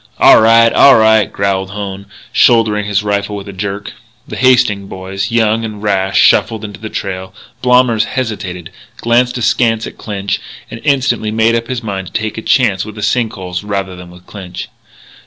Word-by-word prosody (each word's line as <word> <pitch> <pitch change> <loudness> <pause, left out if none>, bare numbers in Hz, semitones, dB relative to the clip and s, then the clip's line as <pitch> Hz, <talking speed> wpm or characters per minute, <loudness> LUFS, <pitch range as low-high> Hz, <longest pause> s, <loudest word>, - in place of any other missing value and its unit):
"All - - +6
right, 115 +1 +5
all 140 -3 +7
right," 110 -1 +3
growled 95 -1 -1
Hone, 100 -1 -7 0.3
shouldering 110 -4 +3
his 105 0 0
rifle 105 0 -2
with 100 0 -8
a 100 - -8
jerk. 100 +1 -5 0.3
The - - -7
Hastings 120 -6 +2
boys, 95 +3 -5
young 115 -1 +1
and 105 -2 -7
rash, 95 -2 +1
shuffled 110 -1 +3
into 105 -1 -9
the 110 - -7
trail. 95 -2 -6 0.3
Blommers 125 -3 +3
hesitated, 95 -9 -5 0.3
glanced 125 +2 +1
askance 115 -1 +1
at - - -10
Clinch, 100 -2 -3 0.3
and 115 - -8
instantly 135 -6 0
made 110 +1 +2
up 115 0 -1
his 125 -2 -4
mind 95 -3 -5
to - - -13
take 110 0 -3
a - - -7
chance 110 -7 +1
with 105 -1 -9
the 105 - -7
sink 115 +2 0
holes 90 0 -6
rather 100 -2 -4
than 90 0 -11
with 90 0 -16
Clinch. 90 -3 -8
105 Hz, 180 wpm, -14 LUFS, 95-115 Hz, 0.3 s, all